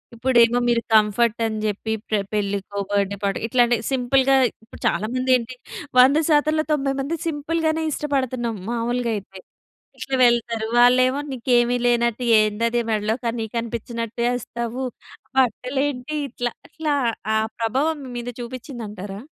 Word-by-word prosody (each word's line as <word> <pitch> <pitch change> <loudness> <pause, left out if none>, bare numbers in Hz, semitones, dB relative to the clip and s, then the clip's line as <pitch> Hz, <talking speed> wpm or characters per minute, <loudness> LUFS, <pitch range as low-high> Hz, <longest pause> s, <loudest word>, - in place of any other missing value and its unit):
ఇప్పుడేమో 240 0 +4
మీరు 235 -1 +2
కంఫర్ట్ 220 +2 +3
అని 220 -1 -2
జెప్పి 215 +1 -2
ప్ర 215 - +1 0.2
పెళ్ళికో 200 -1 -2
బర్త్‌డే‌ 200 0 0
పార్టీ 200 -1 0
ఇట్లాంటి 240 0 +3
సింపుల్‌గా 265 +1 +3 0.3
ఇప్పుడు 220 - -15
చాలా 205 - 0
మంది 255 0 0
ఏంటి 245 +1 -7 0.4
100 265 +4 +7
శాతంలో 310 +1 +3
90 275 +1 0
సింపుల్‌గానే 320 +1 -1
ఇష్టపడుతున్నాం 260 -6 -2
మామూలుగయితే. 235 -4 -2 0.6
ఇట్లా 270 - -2
వెళ్తారు 235 -2 +1
వాళ్ళేమో 255 +3 +5
"నీకేమి 245 -1 +2
లేనట్టు 235 0 +1 0.2
ఏందది 230 +3 +1
మెడలో 215 0 0
కని 230 -1 -2
కనిపించినట్టేస్తావు 235 +1 -3 0.5
బట్టలేంటి" 265 +3 0
ఇట్లా, 245 -1 -3 0.2
ఇట్లా 310 -2 -2 0.4
ఆ - - +3 0.2
ప్రభావం 265 +8 0
మీ 255 - -8
మీద 240 0 -5
చూపిచ్చింది 245 0 -7
అంటారా? 200 0 -7
240 Hz, 120 wpm, -22 LUFS, 225-260 Hz, 0.6 s, 100